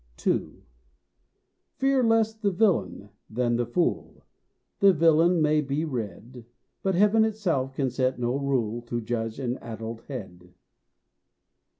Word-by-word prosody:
II. - - -1 1.1
Fear 270 -1 +2
less 225 -1 +3
the 215 -2 -1
villain 185 - 0 0.2
than 120 +1 0
the 120 0 -1
fool. 170 +8 -2 0.6
The 200 -1 +6
villain 165 +1 +4
may 150 0 +3
be 145 +3 -2
read, 120 - -6 0.4
But 190 -1 0
heaven 210 +4 +4
itself 175 -12 -1
can 135 -3 -1
set 130 +1 0
no 120 +1 -1
rule 125 -5 -1
To 120 0 -2
judge 115 -1 -3
an 130 -2 -3
addled 115 0 -7
head. 90 -9 -9
135 Hz, 125 wpm, -26 LUFS, 120-180 Hz, 1.1 s, The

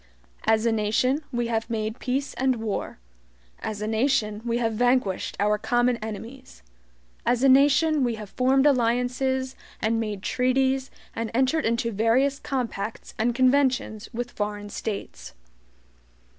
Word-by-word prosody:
As 220 0 +3
a 230 - +3
nation 225 +6 +1
we 240 -2 -1
have 225 0 -2
made 220 0 -3
peace 270 +2 -2
and 260 0 +1
war; 220 -3 -4 0.6
as 210 -1 -4
a - - -2
nation 220 -2 +1
we 235 0 0
have 230 -2 0
vanquished 245 -4 +1
our 210 +1 +2
common 240 +2 +2
enemies; 225 - -9 0.6
as 245 +1 +1
a - - +6
nation 290 +3 +5
we 240 -2 0
have 210 -2 -9
formed 265 +2 +3
alliances, 260 0 +1 0.2
and 225 +1 +1
made 210 -3 -4
treaties, 265 +1 +1 0.3
and 230 -1 -2
entered 265 +4 +2
into 230 +1 0
various 240 +6 +2
compacts 230 -5 -4
and 235 +2 +1
conventions 255 -4 +2
with 245 0 -4
foreign 205 0 -4
states. 210 -1 -6
240 Hz, 140 wpm, -25 LUFS, 220-260 Hz, 0.6 s, a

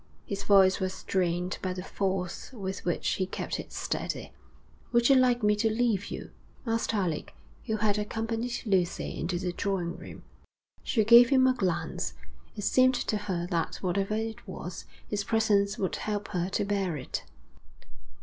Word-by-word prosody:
His 200 -1 -4
voice 195 -2 +5
was 185 0 -2
strained 180 -1 -1
by 185 -1 -1
the 180 0 -5
force 190 -2 -2
with 195 -5 -5
which 175 - -1
he 185 - 0
kept - - -4
it - - -8
steady. - - -3 0.6
'Would 235 +1 +4
you 275 - +7
like 250 -2 +4
me 210 0 +4
to 225 +1 +2
leave 220 -3 +1
you?' - - -7 0.3
asked 230 -1 0
Alec, 180 -7 -2 0.3
who 220 - +1
had 210 -1 +1
accompanied 225 +3 -2
Lucy 185 -5 0
into 175 +2 -1
the 180 0 -2
drawing 180 -3 -1
room. - - -10 0.6
She 220 - +1
gave 235 +2 +8
him 260 -2 +5
a 260 - +5
glance. 175 -8 -2 0.4
It 205 - -5
seemed 255 +4 +4
to 220 - -1
her 190 -4 -2
that 170 -2 0
whatever 195 +3 0
it 220 0 -4
was, - - -7 0.2
his 205 -1 -1
presence 210 -2 +2
would 190 - -1
help 205 -1 -3
her 180 -1 -1
to 200 - 0
bear 195 -5 0
it. 130 - -4
200 Hz, 170 wpm, -29 LUFS, 185-225 Hz, 0.6 s, gave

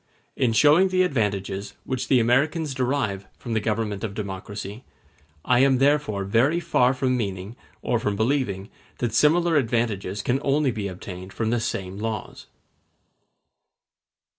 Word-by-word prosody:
In 125 -3 +2
showing 150 +10 +5
the 185 0 +2
advantages 100 - -2
which 130 -1 -3
the 130 - +4
Americans 140 +6 +1
derive 125 -7 -1
from 120 - -5
the 110 - +2
government 105 -1 -2
of 100 -3 -4
democracy, 100 +2 -6 0.6
I 125 -1 +4
am 135 0 +4
therefore 140 -7 +2
very 120 - +2
far 130 -6 +2
from 130 -1 +1
meaning, 100 -2 -4 0.3
or 120 - +1
from 105 -2 -1
believing, 110 -4 -1 0.3
that 120 -3 -2
similar 165 +5 +4
advantages 110 -6 -1
can 130 +2 +1
only 140 -1 +2
be 105 -3 -3
obtained 95 0 -8
from 110 -1 -1
the 120 - +1
same 100 -4 -4
laws. 110 -1 -5
115 Hz, 140 wpm, -24 LUFS, 100-135 Hz, 0.6 s, showing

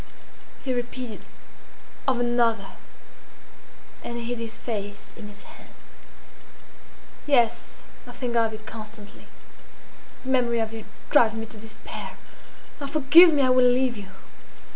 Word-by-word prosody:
He 260 - 0
repeated, 245 -2 -5 0.8
"of 260 -2 +2
another!" 235 -4 +1 1.3
And 235 - -5
he 235 - -5
hid 240 0 -3
his 230 -1 -5
face 205 -3 -6
in 220 -3 -9
his 205 -1 -14
hands. - - -15 1.6
"Yes, 235 -4 +1 0.2
I - - -8
think 245 -3 -4
of 225 -1 +3
you 215 - -6
constantly. 215 -1 -10 1.0
The 260 - -6
memory 245 -3 +2
of 225 0 -2
you 225 -1 -7 0.3
drives 230 -6 +5
me 225 0 -4
to 220 - -9
despair. 220 +1 -8 0.6
Ah! 280 - -3
forgive 310 +5 +7
me! 290 -3 +3
I 255 - +4
will 255 -1 +6
leave 250 0 +2
you! 205 -3 -8
235 Hz, 135 wpm, -25 LUFS, 220-255 Hz, 1.6 s, forgive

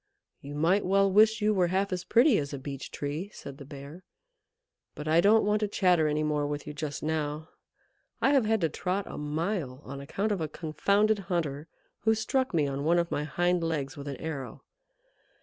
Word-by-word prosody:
"You 145 +1 -8
might 170 +7 +2
well 195 +1 +3
wish 220 +2 +5
you 215 0 +3
were 185 -3 +2
half 190 +2 0
as 180 -1 -3
pretty 240 0 +4
as 140 -1 -4
a - - -5
Beech 135 0 -7
Tree," 150 +7 -4
said 140 0 -9
the 140 - -9
Bear. 145 +5 -10 0.9
"But 150 - -6
I 160 +2 +5
don't 215 +3 +5
want 210 +1 +2
to 210 - 0
chatter 180 -5 +3
any 150 0 0
more 150 -1 0
with 145 0 -4
you 150 - -6
just 145 -1 -5
now. 155 0 -2 0.7
I 270 - +3
have 270 -5 +4
had 220 -1 +1
to 165 - +2
trot 185 +5 -2
a - - -7
mile 150 -2 -2
on 140 +1 -7
account 200 +9 -2
of 195 -5 -1
a 155 - -1
confounded 200 +8 +1
hunter 155 -4 -2 0.3
who 220 +1 +2
struck 260 +4 0
me 155 -4 +2
on 140 0 -3
one 170 +3 +3
of 170 0 0
my 150 - -1
hind 175 +3 +1
legs 150 -5 -2
with 140 0 -8
an 140 -2 -4
arrow. 145 -4 -6
165 Hz, 205 wpm, -29 LUFS, 145-200 Hz, 0.9 s, wish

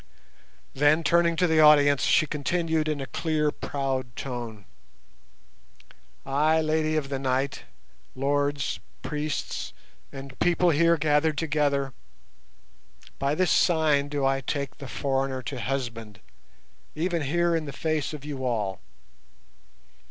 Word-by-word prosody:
Then, 150 +4 +3
turning 170 +2 +3
to 180 - +2
the 160 -2 +3
audience, 145 -2 +6
she - - +4
continued 160 +1 -1
in 155 -2 -1
a 135 - -4
clear 155 0 0
proud 135 -5 -3
tone, 120 -6 -6 1.6
"Ay, 150 +4 +2
Lady 155 0 0
of 145 -3 -1
the 135 -1 -2
Night, 135 +1 -1 0.5
Lords, 140 +1 0 0.2
Priests, 150 -1 -3 0.4
and 135 -1 -10
People 175 0 +3
here 170 +2 +4
gathered 150 +1 +2
together, 145 -4 0 1.3
by 140 +2 0
this 185 +1 +2
sign 155 -5 +3
do 145 -2 -1
I 135 0 +1
take 140 +2 -4
the 140 - -7
foreigner 135 -1 -2
to 130 -1 -5
husband, 115 -6 -4 0.8
even 170 +1 -1
here 170 +4 +1
in 160 -1 -1
the 140 - -6
face 155 +1 -2
of 150 -2 -8
you 140 -3 -5
all. 105 -6 -1
145 Hz, 125 wpm, -26 LUFS, 135-155 Hz, 1.6 s, audience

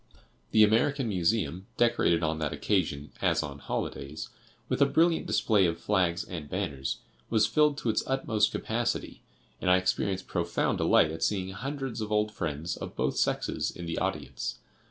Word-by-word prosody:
The 110 - +6
American 120 +4 +3
Museum, 95 -2 0
decorated 85 -8 +3
on 80 0 0
that 75 -2 -1
occasion, 80 -8 -1
as - - +2
on 70 -1 -7
holidays, 70 +2 -4 0.4
with - - -1
a - - +7
brilliant 165 0 +2
display 105 -5 +3
of 85 - -2
flags 90 -4 +1
and 80 -5 -7
banners, 70 -1 -2 0.3
was 110 -2 +4
filled 150 -2 +3
to 120 - -2
its 105 - 0
utmost 110 -6 +1
capacity, 115 +2 -2 0.4
and - - +1
I 90 - +7
experienced 95 +1 0
profound - - -1
delight 80 - +4
at 80 - -6
seeing 95 -3 0
hundreds 135 +3 -4
of 110 0 -4
old 105 0 +2
friends 80 -3 -3
of - - -7
both - - 0
sexes - - 0
in 85 - -7
the 85 - -2
audience. - - -3
95 Hz, 165 wpm, -29 LUFS, 85-115 Hz, 0.4 s, a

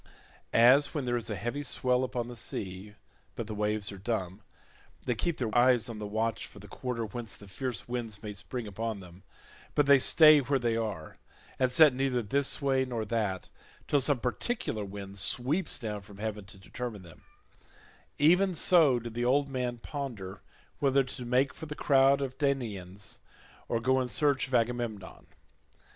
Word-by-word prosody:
As 130 +7 +5
when 145 -4 -2
there 120 0 0
is 120 -1 -3
a 105 - -2
heavy 120 +8 -3
swell 125 -2 0
upon 125 -2 -3
the 120 - -8
sea, 100 -1 -5 0.4
but 115 - -4
the 110 - -6
waves 105 0 -1
are 100 - -9
dumb—they 100 +3 -6
keep 165 +8 -2
their 115 -3 -3
eyes 120 -1 +4
on 110 -2 -6
the 105 - -4
watch 110 +2 -2
for - - -16
the 100 0 -11
quarter 115 +2 -4
whence 115 +1 -7
the 100 - -14
fierce 120 +5 -4
winds 115 -4 -5
may 105 -1 -5
spring 115 +4 -6
upon 110 +1 -4
them, 90 -1 -13 0.5
but 145 - +4
they 140 -1 +6
stay 155 +2 +8
where 140 +1 0
they 120 -3 0
are 105 -9 -4 0.4
and 130 -1 +2
set 150 +1 +7
neither 125 -2 0
this 135 +6 +1
way 135 -2 +2
nor 120 -4 -3
that, 105 -4 -2 0.4
till 145 - +2
some 140 +1 +2
particular 125 - -2
wind 100 0 -7
sweeps 140 - 0
down 105 -4 -5
from 100 0 -14
heaven 105 -1 -4
to 95 - -12
determine 110 +1 -7
them—even 170 - -2
so 160 -6 +5
did 120 -1 -6
the 120 +1 -2
old 140 +3 +2
man 125 -2 -2
ponder 115 -8 -6 0.4
whether 135 -1 +3
to 125 -1 -7
make 130 +2 +2
for 160 - -9
the 150 - -6
crowd 140 -1 +4
of 130 -1 -6
Danaans, 105 - -3 0.5
or 115 - 0
go 130 +2 +2
in 125 - -2
search 135 0 +1
of 130 - -1
Agamemnon. 115 -4 -2
120 Hz, 175 wpm, -29 LUFS, 105-135 Hz, 0.5 s, stay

